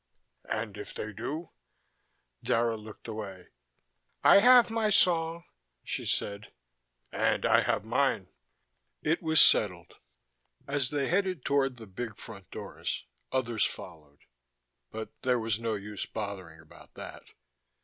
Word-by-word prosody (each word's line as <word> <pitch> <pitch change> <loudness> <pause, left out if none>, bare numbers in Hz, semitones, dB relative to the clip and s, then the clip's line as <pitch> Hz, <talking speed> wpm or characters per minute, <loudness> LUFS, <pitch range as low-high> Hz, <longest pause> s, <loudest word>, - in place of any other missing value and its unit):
"And 110 -1 -3
if 105 - -8
they 110 0 -5
do?" 150 - -5 0.9
Dara 115 0 +1
looked 110 +1 -11
away. 100 -5 -7 0.7
"I - - +9
have 245 +1 +7
my 225 -1 +1
song," 170 -4 +3 0.4
she - - -4
said. 100 +1 -2 0.6
"And - - +1
I - - +5
have - - 0
mine." - - +1 0.8
It 160 +2 +1
was 160 -2 +3
settled. 90 -5 +4 0.7
As 140 -2 0
they 140 -2 0
headed 185 -5 0
toward 135 -2 +1
the 115 - -10
big 110 +3 -6
front 100 -5 -11
doors - - -5 0.3
others 120 -4 0
followed, 75 -2 -6 0.7
but 110 0 -6
there 125 -1 +2
was 110 -2 0
no 115 -1 -1
use 105 0 -5
bothering 95 -6 -6
about 80 -1 -17
that. - - -8
115 Hz, 130 wpm, -30 LUFS, 105-150 Hz, 0.9 s, I